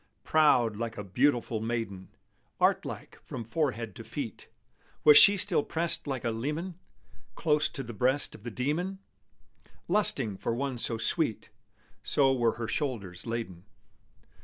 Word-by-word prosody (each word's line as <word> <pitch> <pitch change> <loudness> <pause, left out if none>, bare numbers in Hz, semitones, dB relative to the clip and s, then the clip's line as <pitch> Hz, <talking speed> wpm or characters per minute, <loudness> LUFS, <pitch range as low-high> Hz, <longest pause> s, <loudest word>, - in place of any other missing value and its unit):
Proud 125 -9 +3
like 115 0 -4
a 105 - -4
beautiful 120 +2 +1
maiden, 110 -5 -4 0.5
Art - - +2
like - - -8
from 120 - -7
forehead 115 - -2
to - - -8
feet, - - -7 0.6
Was 150 - +8
she 200 0 +9
till 185 -4 +1
pressed 165 +1 0
like 130 -4 -3
a 115 - 0
leman 150 +11 -3 0.6
Close 150 -2 +1
to 135 - -6
the 120 -1 -8
breast 130 +6 +1
of - - -12
the 120 - -6
demon, 150 - -2 0.9
Lusting 135 - +2
for 115 - -2
one 135 -1 -3
so 115 0 -1
sweet, 115 +2 0 0.5
So 135 -2 +2
were 120 -3 +1
her 115 -1 -5
shoulders 115 - -3
laden. 105 -6 -5
120 Hz, 145 wpm, -29 LUFS, 115-150 Hz, 0.9 s, she